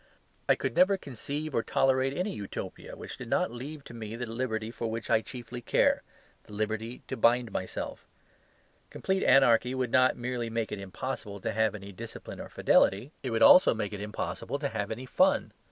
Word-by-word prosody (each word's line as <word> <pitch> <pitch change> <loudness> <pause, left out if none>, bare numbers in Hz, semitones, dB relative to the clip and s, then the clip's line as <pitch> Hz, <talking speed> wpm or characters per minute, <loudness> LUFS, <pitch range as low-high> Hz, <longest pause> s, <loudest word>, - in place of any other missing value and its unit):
I - - +7
could - - -3
never 195 +2 +5
conceive 145 - -5
or 115 - +2
tolerate 135 +2 +1
any 190 +3 -1
Utopia 100 -2 -7
which - - -8
did - - -8
not - - +1
leave 140 +5 -7
to - - -11
me 110 -1 -6
the 120 +1 -4
liberty 115 -1 -3
for 115 -1 -4
which 115 0 -4
I 110 - +5
chiefly 120 0 -8
care, - - +3 0.4
the - - -13
liberty 110 +3 -3
to - - -3
bind 120 0 +3
myself. 95 - -5 0.8
Complete 190 0 -1
anarchy 125 -1 +5
would 130 -2 -1
not 130 -1 +4
merely 120 -1 -3
make 115 -1 -2
it 105 - -4
impossible 100 +1 -5
to 110 - -1
have 110 0 +1
any 100 -1 -8
discipline 115 +4 -9
or - - -7
fidelity; 105 +9 +3
it 130 - -3
would 115 -1 +2
also 185 - +8
make 105 -2 -3
it 100 - -5
impossible 105 +6 -4
to 140 -1 -2
have 105 -4 -3
any 120 +4 -5
fun. - - +2
115 Hz, 190 wpm, -29 LUFS, 110-130 Hz, 0.8 s, also